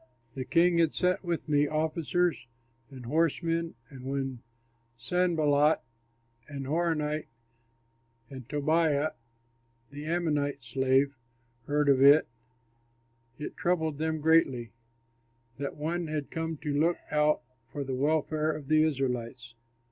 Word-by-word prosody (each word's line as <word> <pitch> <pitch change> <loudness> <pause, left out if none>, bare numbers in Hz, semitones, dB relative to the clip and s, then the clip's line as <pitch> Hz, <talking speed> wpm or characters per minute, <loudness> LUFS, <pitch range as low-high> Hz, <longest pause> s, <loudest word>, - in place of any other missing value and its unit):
The 130 -1 -5
king 170 +4 +3
had 165 -2 +2
sent 180 +1 +1
with 170 -3 -3
me 145 -1 +3
officers 160 0 0 0.4
and 130 -3 -10
horsemen; 165 +3 0
and 130 -3 -11
when 135 -2 -3 0.6
Sanballat, 155 -1 +2 0.7
the 145 - -10
Horonite, 155 +1 -1 1.0
and 130 -4 -10
Tobiah, 155 0 +1 0.8
the 145 +1 -8
Ammonite 150 -5 -1
slave, 130 +3 +1 0.5
heard 150 0 +1
of 135 -2 +4
it, 140 +3 +7 1.1
it 150 - -6
troubled 160 -4 0
them 160 -1 -1
greatly, 135 -8 +3 0.9
that 140 -1 -4
one 165 +3 -2
had 150 -2 -4
come 160 -1 -3
to 150 -2 -1
look 170 +3 +2
out 150 0 +2 0.3
for 145 - -4
the 135 -1 -4
welfare 155 +3 +1
of 150 -2 -7
the 155 0 +5
Israelites. 125 -5 -2
150 Hz, 115 wpm, -29 LUFS, 140-160 Hz, 1.1 s, it